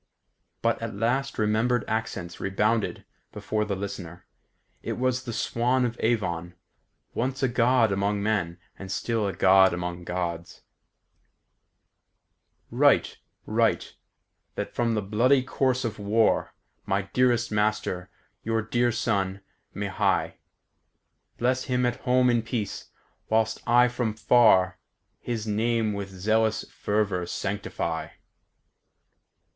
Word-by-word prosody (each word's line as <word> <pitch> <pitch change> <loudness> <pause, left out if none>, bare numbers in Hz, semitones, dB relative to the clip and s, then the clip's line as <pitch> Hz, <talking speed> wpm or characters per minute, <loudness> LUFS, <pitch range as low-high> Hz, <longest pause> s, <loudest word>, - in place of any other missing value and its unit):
But - - +1
at - - -4
last 125 +6 0
remembered 110 +3 +1
accents 100 -6 -3
rebounded 105 +3 0 0.3
before 105 0 -2
the 100 -2 -2
listener. 95 -3 -7 0.6
It - - -3
was 130 0 0
the 120 - -4
Swan 125 +3 +1
of 120 -1 -2
Avon, 90 -7 -1 0.6
once 130 +3 -2
a - - +4
God 120 -2 +3
among 100 +1 0
men, 95 -6 0 0.2
and 95 -1 -7
still 110 +1 -1
a 95 - -2
God 95 +1 +5
among 90 0 -5
Gods: 85 -1 -4 2.1
"Write, - - +3 0.3
write, - - +1 0.6
that - - -4
from 115 -1 0
the 105 - -1
bloody 125 +7 +3
course 130 -1 0
of 110 -2 -4
war, 105 +2 +1 0.3
My 95 +1 0
dearest 120 +3 +1
master, 105 -3 -1 0.3
your 115 0 0
dear 120 +2 +1
son, 100 -4 -1 0.3
may - - -4
hie; - - 0 1.0
Bless 130 +2 0
him 125 -2 +1
at 120 0 0
home 125 0 +3
in 120 -1 +3
peace, 115 -3 -4 0.4
whilst 110 0 +1
I 120 +1 +6
from 120 -3 -2
far, 105 -5 +4 0.4
His 115 -3 -4
name 110 0 0
with 100 -1 -5
zealous 110 +3 0
fervour 100 -4 -1
sanctify." 95 -4 -3
110 Hz, 120 wpm, -26 LUFS, 95-120 Hz, 2.1 s, I